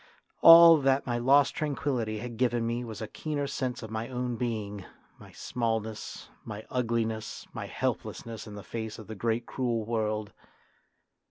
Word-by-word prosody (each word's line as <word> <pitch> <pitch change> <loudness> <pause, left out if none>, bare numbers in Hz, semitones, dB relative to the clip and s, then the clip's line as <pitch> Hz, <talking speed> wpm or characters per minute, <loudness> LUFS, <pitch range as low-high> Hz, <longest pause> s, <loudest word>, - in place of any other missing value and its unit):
All 165 0 +10
that 135 -1 +2
my 120 -1 -1
lost 135 +3 +4
tranquillity 130 -7 -2
had 120 +1 -6
given 120 -1 +1
me 120 +1 -2
was 110 -2 -6
a - - -4
keener 150 +2 -3
sense 130 -3 -3
of 110 - -8
my 110 +1 -3
own 125 -1 -2
being; 110 -4 -3 0.4
my - - -14
smallness, 110 -2 -3 0.2
my 110 -1 -7
ugliness, 115 -3 -2
my - - -5
helplessness 115 -2 -4
in 105 - -9
the 100 - -8
face 110 0 -5
of 110 - -10
the 110 - -7
great 115 +2 -1
cruel 120 -4 -2
world. 110 -2 -2
115 Hz, 160 wpm, -29 LUFS, 110-125 Hz, 0.4 s, All